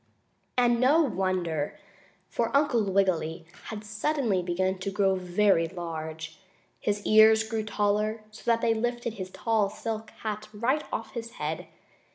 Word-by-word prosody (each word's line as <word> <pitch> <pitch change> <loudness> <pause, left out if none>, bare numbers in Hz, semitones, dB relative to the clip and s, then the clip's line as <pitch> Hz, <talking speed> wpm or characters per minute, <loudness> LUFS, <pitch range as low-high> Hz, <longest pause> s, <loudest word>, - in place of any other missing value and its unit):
And 240 -1 +4
no 290 +6 +5
wonder! 185 - -1 0.5
For 230 - -1
Uncle 280 -6 +2
Wiggily 175 -4 +1 0.2
had 215 -1 -6
suddenly 210 -1 0
begun 185 +2 -1
to 185 - -3
grow 195 -1 +2
very 185 -1 +2
large. 160 -2 -6 0.4
His 205 0 -2
ears 220 0 +7
grew 220 0 -2
taller, 210 +1 0
so 215 - -12
that 230 -1 +3
they 230 - +3
lifted 240 0 -2
his 185 -4 -6
tall 220 0 +1
silk 220 +1 -5
hat 215 -1 -4
right 260 +8 +1
off 225 - -4
his 230 -1 -6
head. 155 +1 -4
210 Hz, 145 wpm, -28 LUFS, 185-230 Hz, 0.5 s, ears